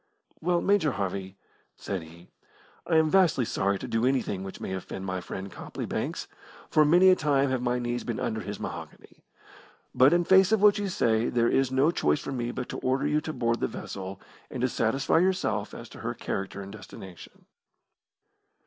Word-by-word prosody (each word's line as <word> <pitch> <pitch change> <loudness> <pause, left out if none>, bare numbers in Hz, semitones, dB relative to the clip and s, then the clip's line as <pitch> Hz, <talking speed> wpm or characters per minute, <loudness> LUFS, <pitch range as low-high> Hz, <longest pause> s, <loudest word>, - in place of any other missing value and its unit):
"Well, 175 +1 +1
Major 190 -9 +2
Harvey," 95 -1 -4 0.4
said 95 -3 -4
he, 85 +2 -15 0.6
"I 165 - +2
am 160 -1 +4
vastly 175 -10 +4
sorry 100 -1 0
to - - -7
do 115 0 0
anything 125 -7 0
which 95 - -8
may 95 - -4
offend 95 0 -6
my 95 -1 -3
friend 95 +2 -7
Copley - - -6
Banks, - - -3 0.4
for 155 - +5
many 175 +5 +6
a - - +6
time 140 -4 +1
have 130 -2 0
my 125 0 0
knees 120 0 -2
been 120 - -3
under 110 0 -2
his 105 0 -6
mahogany, - - -8 0.7
but 130 +2 +6
in 175 0 +3
face 190 +2 +5
of 220 - +4
what 205 0 +5
you 205 - -1
say 115 -8 +1
there 120 -1 +2
is 135 -1 +2
no 135 +5 +3
choice 75 - +1
for - - -6
me 120 -3 -2
but 125 0 -4
to - - -5
order 130 +1 0
you 150 +1 +1
to 155 - -4
board 115 -5 0
the - - 0
vessel 95 0 -7 0.3
and 130 - -5
to 130 - +2
satisfy 135 +7 +1
yourself 170 - 0
as - - -9
to - - -12
her - - -4
character 100 0 -4
and 95 - -9
destination." 95 -3 -12
125 Hz, 195 wpm, -27 LUFS, 100-155 Hz, 0.7 s, many